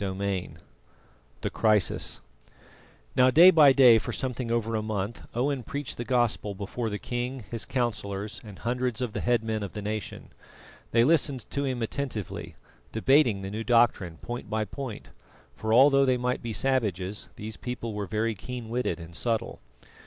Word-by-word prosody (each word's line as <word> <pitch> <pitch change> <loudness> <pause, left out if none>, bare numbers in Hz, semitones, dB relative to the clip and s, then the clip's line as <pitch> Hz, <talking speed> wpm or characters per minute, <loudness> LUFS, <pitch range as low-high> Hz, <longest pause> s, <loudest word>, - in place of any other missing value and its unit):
CHAPTER 95 0 -3
IX 95 -3 -2 0.9
THE - - -2
CRISIS 105 -3 +1 0.9
Now, 130 0 +6
day 170 +7 +8
by 150 -5 +7
day 125 -4 +7
for - - -5
something 125 -2 -3
over 115 -1 0
a 110 - 0
month 105 0 -4
Owen 135 +2 0
preached 140 +3 -5
the 120 - -3
Gospel 120 -5 0
before 105 +4 -4
the 105 - -3
king, 125 +2 -4
his 115 -2 -3
councillors, 105 -4 -3
and 105 -4 -11
hundreds 125 -1 -2
of 120 -4 -2
the - - -3
head 120 -2 +2
men 110 -1 -2
of 100 -3 -5
the 105 - -5
nation. 105 -1 -5 0.6
They 115 0 +4
listened 140 -3 +2
to 140 0 -1
him 130 -3 -2
attentively, 115 - -4 0.4
debating 115 -3 +3
the 95 - -5
new 110 +2 -4
doctrine 115 -8 +2
point 120 +6 -7
by 110 0 0
point; 130 -2 -7 0.4
for 110 - -3
although 135 +3 +6
they 130 -1 +2
might 125 +1 -1
be 115 - -4
savages, 105 -7 -1
these 110 +1 -7
people 120 -2 -5
were 105 -1 -4
very 110 +2 0
keen 120 +2 -7
witted 125 -4 -1
and 85 0 -10
subtle. 115 +2 -1
115 Hz, 170 wpm, -27 LUFS, 105-125 Hz, 0.9 s, day